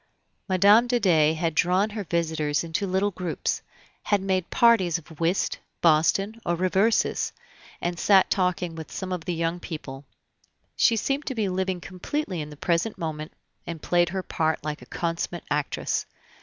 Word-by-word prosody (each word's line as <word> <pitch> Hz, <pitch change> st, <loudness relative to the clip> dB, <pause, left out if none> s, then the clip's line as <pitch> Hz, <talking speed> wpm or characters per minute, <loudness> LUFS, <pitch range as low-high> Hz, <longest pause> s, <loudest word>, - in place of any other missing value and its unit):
Mme. 205 Hz, +6 st, +6 dB
de 245 Hz, 0 st, +2 dB
Dey 160 Hz, -6 st, +4 dB
had 165 Hz, 0 st, -1 dB
drawn 185 Hz, +6 st, +2 dB
her 210 Hz, -1 st, -4 dB
visitors 160 Hz, -4 st, 0 dB
into 170 Hz, +4 st, -2 dB
little 190 Hz, +2 st, +1 dB
groups, 180 Hz, -3 st, -2 dB, 0.4 s
had 205 Hz, -, +2 dB
made 190 Hz, -2 st, -1 dB
parties 205 Hz, -8 st, +4 dB
of 160 Hz, -1 st, -14 dB
whist, 170 Hz, +3 st, 0 dB, 0.2 s
boston, 195 Hz, +7 st, +2 dB
or 175 Hz, -, 0 dB
reversis, 190 Hz, +5 st, +1 dB, 0.5 s
and 175 Hz, 0 st, -2 dB
sat 195 Hz, -2 st, +5 dB
talking 180 Hz, -2 st, 0 dB
with 160 Hz, -1 st, -8 dB
some 190 Hz, -1 st, -5 dB
of 175 Hz, -3 st, -5 dB
the 175 Hz, -, -2 dB
young 165 Hz, +1 st, -1 dB
people; 145 Hz, -6 st, -7 dB, 0.7 s
she 230 Hz, -, +4 dB
seemed 275 Hz, +6 st, -1 dB
to 265 Hz, -, -2 dB
be 215 Hz, -3 st, 0 dB
living 185 Hz, 0 st, -1 dB
completely 185 Hz, -, -4 dB
in 150 Hz, -, -6 dB
the 150 Hz, -, -11 dB
present 170 Hz, +8 st, 0 dB
moment, 155 Hz, -1 st, -4 dB, 0.4 s
and 165 Hz, -2 st, -6 dB
played 175 Hz, -1 st, +2 dB
her 190 Hz, +1 st, -3 dB
part 160 Hz, -3 st, -1 dB
like 150 Hz, 0 st, -4 dB
a -, -, -13 dB
consummate 170 Hz, 0 st, -3 dB
actress. 145 Hz, -1 st, -1 dB
175 Hz, 165 wpm, -25 LUFS, 165-195 Hz, 0.7 s, Mme